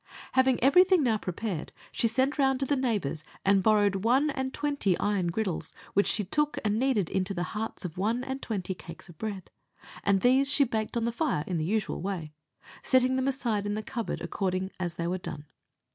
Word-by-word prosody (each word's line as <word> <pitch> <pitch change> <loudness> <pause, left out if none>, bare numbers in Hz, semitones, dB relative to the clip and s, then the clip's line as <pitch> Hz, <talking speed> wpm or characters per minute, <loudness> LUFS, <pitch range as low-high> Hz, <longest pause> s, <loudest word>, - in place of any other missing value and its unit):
Having 260 -2 +3
everything 360 +4 +6
now 225 -4 +2
prepared, 180 -3 -4 0.2
she 230 - +1
sent 260 +6 0
round 270 -1 +3
to 275 - 0
the 285 - +1
neighbours 210 - -1 0.2
and 195 0 +4
borrowed 205 -1 +3
one 265 +6 +3
and 265 -1 -3
twenty 280 -11 0
iron 205 -4 0
griddles, 185 -1 -2 0.2
which 200 - +3
she 210 - +2
took 300 +10 0
and 210 +1 +1
kneaded 250 -9 +2
into 190 +2 -1
the 175 - -1
hearts 215 -2 -4
of 175 0 -6
one 225 +5 0
and 265 +1 -4
twenty 195 -4 -3
cakes 170 0 -11
of 165 - -14
bread, 205 -4 -5 0.5
and 195 -1 +3
these 265 +3 +4
she 290 - +5
baked 225 -2 -2
on 230 - 0
the 235 - 0
fire 235 - 0
in 180 - -2
the 155 - -1
usual 210 +2 -1
way, 175 -5 -4 0.5
setting 255 0 +3
them 260 0 0
aside 235 -6 -1
in 205 - -1
the 215 - -3
cupboard 230 -6 -4
according 190 -1 -2
as 175 -2 -3
they 170 - -3
were 180 +2 -1
done. 150 -4 -7
215 Hz, 205 wpm, -28 LUFS, 190-260 Hz, 0.5 s, everything